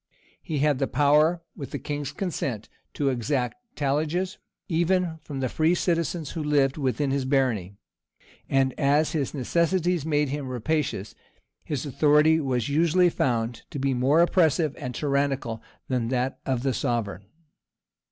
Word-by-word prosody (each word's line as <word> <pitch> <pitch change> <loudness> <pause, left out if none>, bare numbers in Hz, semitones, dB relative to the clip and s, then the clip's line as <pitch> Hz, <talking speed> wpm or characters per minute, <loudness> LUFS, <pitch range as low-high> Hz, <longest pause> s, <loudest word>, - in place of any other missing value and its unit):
He 160 -4 -4
had 145 -1 +2
the 135 - +1
power, 150 +5 +3
with 140 -5 -7
the - - -4
king's 145 -2 -4
consent, 140 - -3 0.3
to 140 -2 +1
exact 125 - -1 0.2
talliages 155 +7 -1 0.3
even 175 -1 +1
from 140 -3 -6
the 130 - +1
free 160 +7 +2
citizens 170 -3 -1
who 160 - -4
lived 140 -2 +2
within 135 -1 -1
his 140 0 0
barony; 125 -8 0 0.7
and 135 -1 +2
as 150 +2 +3
his 150 -3 -2
necessities 170 +4 +1
made 150 -2 +1
him 140 -1 -3
rapacious, 125 -4 -2 0.5
his 145 -1 -3
authority 150 +3 +4
was 125 -6 -1
usually 170 +4 +3
found 115 -4 -1
to - - -6
be 135 0 0
more 135 +6 +3
oppressive 165 -4 +3
and 125 -1 -5
tyrannical 140 -5 -1 0.3
than 125 -3 -1
that 130 +1 -1
of 130 -2 0
the 135 -2 +1
sovereign. 105 - -2
145 Hz, 145 wpm, -26 LUFS, 130-160 Hz, 0.7 s, authority